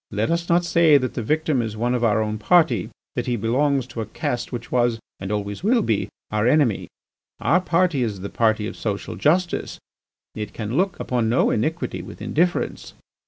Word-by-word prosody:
Let 105 +7 -1
us 170 0 -1
not 175 +1 +3
say 165 -3 +5
that 130 -2 -2
the 120 - -3
victim 155 +2 +1
is 110 -2 -3
not - - -9
one 120 +1 +1
of 120 -1 0
our 110 -1 +3
own 110 0 -3
party, 130 - +3 0.3
that - - -2
he 120 - +1
belongs 130 +4 +1
to 120 -2 -6
a 110 - -5
caste 120 +2 -3
which 120 -1 -6
was, 120 -2 +2 0.2
and 95 +1 -5
always 105 - -3
will 230 +2 +3
be, 110 -3 0 0.2
our 105 +1 +1
enemy. 130 -6 +2 0.5
Our 165 +9 +3
party 175 -5 +1
is 105 -6 -2
the 100 - -5
party 110 -2 +2
of - - -5
social 105 -3 -4
justice; 175 +4 +1 0.6
it 105 -1 -6
can 110 +2 -4
look 185 +2 +1
upon 120 -3 0
no 120 - +3
iniquity 160 +10 -1
with - - -10
indifference. 175 +3 -1
120 Hz, 200 wpm, -23 LUFS, 110-160 Hz, 0.6 s, say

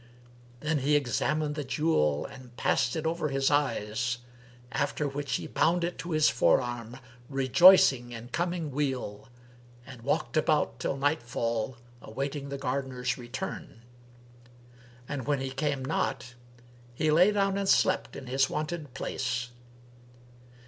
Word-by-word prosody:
Then 150 0 0
he 145 +3 +2
examined 145 +3 0
the 150 0 -3
jewel 130 - +1
and 130 -3 -12
passed 125 -1 +1
it 160 - -3
over 165 -1 0
his 135 0 +1
eyes[FN#329]; 120 -5 0 0.5
after 150 - -1
which 140 0 -3
he - - -3
bound 170 +1 +1
it 175 +1 -3
to 175 - -6
his 155 -2 +4
forearm, 120 0 +1 0.3
rejoicing 135 -2 +6
in 120 +1 -8
coming 170 0 -2
weal, 130 -7 -3 0.6
and 130 -3 -11
walked 120 -1 -1
about 150 -6 +1
till 135 - -2
nightfall 120 -4 -1 0.2
awaiting 140 +4 -4
the 140 - -4
gardener's 130 -1 -2
return; 120 -1 -6 1.2
and 140 -4 -4
when 145 -2 +1
he 135 0 -3
came 135 0 -1
not, 125 -4 -2 0.6
he 155 +4 +1
lay 180 +6 +6
down 195 -1 +1
and 200 -1 -1
slept 185 - +2
in 130 - -8
his 135 +1 +1
wonted 150 -3 -4
place. 125 -2 -2
135 Hz, 135 wpm, -29 LUFS, 125-155 Hz, 1.2 s, rejoicing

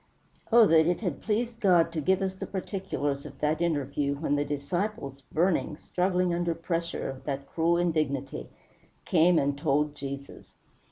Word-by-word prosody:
Oh 230 0 +8
that 160 -3 +5
it 175 +3 0
had 185 -5 -3
pleased 230 +2 -1
God 175 -5 +4
to 160 - -1
give 190 +5 +2
us 190 -1 -1
the 190 - -7
particulars 185 -8 -3
of - - -11
that 155 +2 0
interview 145 -3 0
when 145 0 0
the 145 - +1
disciples, 145 0 -3
burning, 165 -2 +1
struggling 180 0 0
under 170 -1 0
pressure 165 0 -3
of 135 -1 -7
that 140 -1 -3
cruel 165 +3 +1
indignity, 145 - -1 0.6
came 175 0 +4
and 140 -1 +1
told 145 +1 +1
Jesus! 140 -1 -8
165 Hz, 160 wpm, -28 LUFS, 140-180 Hz, 0.6 s, Oh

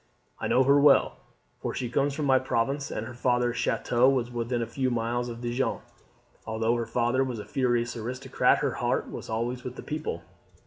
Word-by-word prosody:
I - - -2
know 130 - +4
her 140 +2 +5
well, 145 -1 +5 0.4
for - - -4
she 125 - -2
comes 140 +4 0
from 150 - -2
my 130 -1 +5
province, 135 +3 -1
and 110 - -4
her 125 - -8
father's 120 0 +1
chateau 125 +2 +2
was 125 -3 0
within 120 0 -1
a - - -2
few 130 +3 -1
miles 120 +1 -1
of 115 0 -7
Dijon. 120 +2 -1 0.7
Although 110 +1 +1
her 115 -1 -3
father 120 +3 +1
was 125 -3 -3
a 105 - -7
furious 120 -2 0
aristocrat, 120 +3 +1
her - - +1
heart - - 0
was - - -7
always 120 +3 -2
with 125 0 -6
the - - -8
people. 155 - -4
120 Hz, 195 wpm, -27 LUFS, 115-130 Hz, 0.7 s, her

